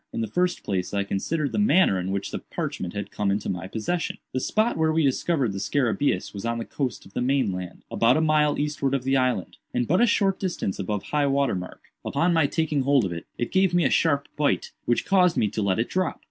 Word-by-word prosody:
In - - -3
the 110 - -1
first 180 - 0
place 95 0 -2
I 100 - +1
considered 140 +10 -2
the - - -1
manner 190 - +4
in 90 +1 -3
which 100 0 -3
the - - -3
parchment 90 0 -5
had 100 -1 -4
come 105 -1 -1
into 100 +1 -1
my 90 -1 -3
possession. 140 - -2 0.2
The 130 - 0
spot 215 - +1
where 160 0 +2
we 160 0 +2
discovered 135 - +1
the 100 - -4
scarabæus 125 -2 0
was 100 - -6
on 115 0 -1
the 115 - -4
coast 135 -4 -4
of 100 - -16
the - - -2
main 130 -4 +1
land, 90 -1 -7
about 115 +4 +3
a - - +3
mile 150 -2 +3
eastward 145 -2 0
of 130 - -2
the 135 +1 +1
island, 125 -8 0 0.2
and 120 - +1
but 180 +6 +3
a 240 - +5
short 195 -3 +2
distance 175 - -2
above 105 +1 -2
high 145 -1 0
water 140 0 +2
mark. 90 -1 -6 0.2
Upon 175 +1 +1
my 160 -3 +3
taking 155 -1 0
hold 135 -3 +3
of 90 - -3
it, 85 - -7
it 120 - -2
gave 190 -2 +3
me 175 -3 +3
a - - +2
sharp 145 -4 +2
bite, 145 -1 0
which 120 - +1
caused 180 -3 +3
me 105 - +2
to 110 - -3
let 95 -2 +1
it 115 - 0
drop. 185 -2 -1
135 Hz, 245 wpm, -25 LUFS, 100-160 Hz, 0.2 s, a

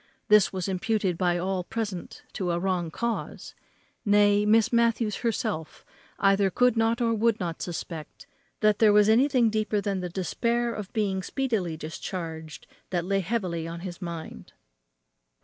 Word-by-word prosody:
This 210 -2 +6
was 185 -1 -3
imputed 190 0 0
by 175 0 +1
all 185 +1 -1
present 205 -2 -5
to 185 -2 -2
a 170 - +1
wrong 180 -2 -1
cause; 235 +6 -4 0.5
nay, 205 0 +4
Miss 225 +3 +4
Matthews 230 -2 +2
herself 215 -8 -3 0.3
either 195 0 +3
could 250 +5 +3
not 225 +2 +1
or 230 -1 +2
would 225 0 +2
not 170 -3 -4
suspect 165 -2 -6 0.4
that 215 -1 +3
there 215 -2 +6
was 210 0 +5
anything 245 0 +4
deeper 215 -1 0
than 200 -2 -2
the 180 -1 -4
despair 235 +7 -1
of 210 -3 -6
being 195 -3 0
speedily 200 - -2
discharged 160 0 -6 0.2
that 175 -2 -1
lay 195 +1 +1
heavy 180 -5 -2
on 170 +1 -6
his 180 0 -7
mind. 170 -2 -7
200 Hz, 150 wpm, -27 LUFS, 175-225 Hz, 0.5 s, This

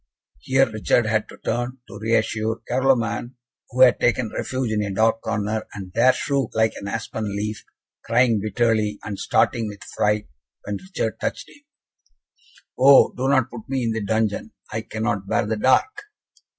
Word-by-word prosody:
Here 130 +1 +2
Richard 110 +2 +1
had 110 -1 0
to - - -12
turn, 120 +2 -2
to - - -10
reassure 110 0 0
Carloman, 125 -1 0 0.3
who 130 +1 -2
had 125 -2 +7
taken 120 -2 +1
refuge 130 -3 -2
in 105 -1 0
a 100 -1 -2
dark 110 +3 +2
corner, 110 0 -2
and 95 -2 -8
there 120 +3 +5
shook 135 -1 -2
like 110 0 +2
an 100 - -7
aspen 110 -1 -4
leaf, 105 +1 -4 0.4
crying 115 -1 +3
bitterly, 110 -1 +1
and 100 -2 -5
starting 115 -2 +1
with 105 -1 -9
fright, 105 0 -1 0.4
when 105 0 -4
Richard 190 0 -4
touched - - -4
him. 290 - -18 1.2
"Oh, 135 +1 +7
do 130 +1 -2
not 130 -2 +2
put 120 -1 -10
me 135 -2 -1
in 115 - 0
the 110 -1 -2
dungeon. 110 0 -1 0.2
I 110 - -2
cannot 110 -3 -3
bear 115 - +1
the 110 +1 -2
dark." 415 - +2
115 Hz, 165 wpm, -23 LUFS, 105-125 Hz, 1.2 s, had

